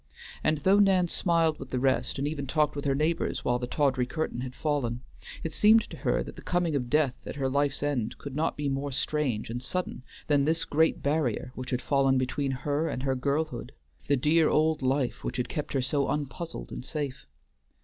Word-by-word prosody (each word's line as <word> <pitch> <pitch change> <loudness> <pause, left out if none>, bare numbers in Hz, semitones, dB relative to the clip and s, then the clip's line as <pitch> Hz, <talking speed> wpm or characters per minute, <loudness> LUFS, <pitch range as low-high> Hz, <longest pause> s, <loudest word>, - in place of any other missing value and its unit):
And 155 - +2
though 195 +2 +5
Nan 190 -3 +4
smiled 165 -3 +2
with 135 - -8
the 130 - -2
rest, 130 +2 +1
and 140 +1 -1
even 145 -2 -3
talked 150 +1 +1
with 145 - -4
her 135 -1 +2
neighbors 155 +4 0
while 125 0 +2
the 125 - -3
tawdry 130 -2 +1
curtain 155 -4 -3
had 130 0 -6
fallen, 130 -6 -1 0.4
it 165 - -2
seemed 220 +4 +5
to - - -7
her - - 0
that - - -9
the - - -10
coming 175 -3 0
of 125 -3 -1
Death 145 -2 +3
at - - -5
her 135 -2 0
life's 140 +1 0
end 130 -7 -1
could 140 -2 -8
not 160 +2 0
be 145 -1 -1
more 140 +1 -2
strange 130 -5 -1
and 120 +1 -4
sudden 180 +2 -3 0.2
than 145 -2 +3
this 160 +2 +1
great 160 +2 +2
barrier 140 -5 0
which 130 0 -6
had 125 - -1
fallen 135 -2 +3
between 130 +2 -1 0.2
her 150 +3 +1
and 130 - -3
her 135 -1 +1
girlhood, 140 0 -2 0.3
the 140 - +3
dear 155 +4 +4
old 155 0 +2
life 130 -1 0
which - - -3
had 125 -1 -1
kept 150 - -4
her 135 -2 +1
so 140 +1 +1
unpuzzled 145 - -4
and - - -6
safe. 140 -3 -4
140 Hz, 210 wpm, -28 LUFS, 130-155 Hz, 0.4 s, though